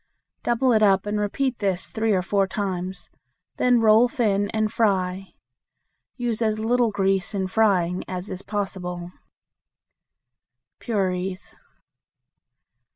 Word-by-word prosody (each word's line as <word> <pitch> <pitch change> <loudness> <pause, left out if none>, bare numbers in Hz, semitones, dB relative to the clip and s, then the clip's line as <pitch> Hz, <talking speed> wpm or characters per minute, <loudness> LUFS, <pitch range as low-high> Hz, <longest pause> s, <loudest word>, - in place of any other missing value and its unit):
Double 240 +1 +2
it 215 - +3
up 195 -2 +4
and 210 0 -1
repeat 250 +5 -1
this 190 -3 -1
three 220 0 -1
or 185 -3 +2
four 195 +1 +1
times; 190 -2 -4 0.5
then 245 -1 +3
roll 220 +2 +6
thin 210 -6 0
and 215 -1 -1
fry. 195 -4 0 0.9
Use 240 -3 -2
as 215 -1 +1
little 235 +2 +2
grease 195 -1 0
in 190 -1 0
frying 185 -3 +1
as 185 +1 -5
is 185 - -5
possible. 180 -4 -4 1.7
Puris. 190 -3 -2
205 Hz, 115 wpm, -24 LUFS, 185-220 Hz, 1.7 s, roll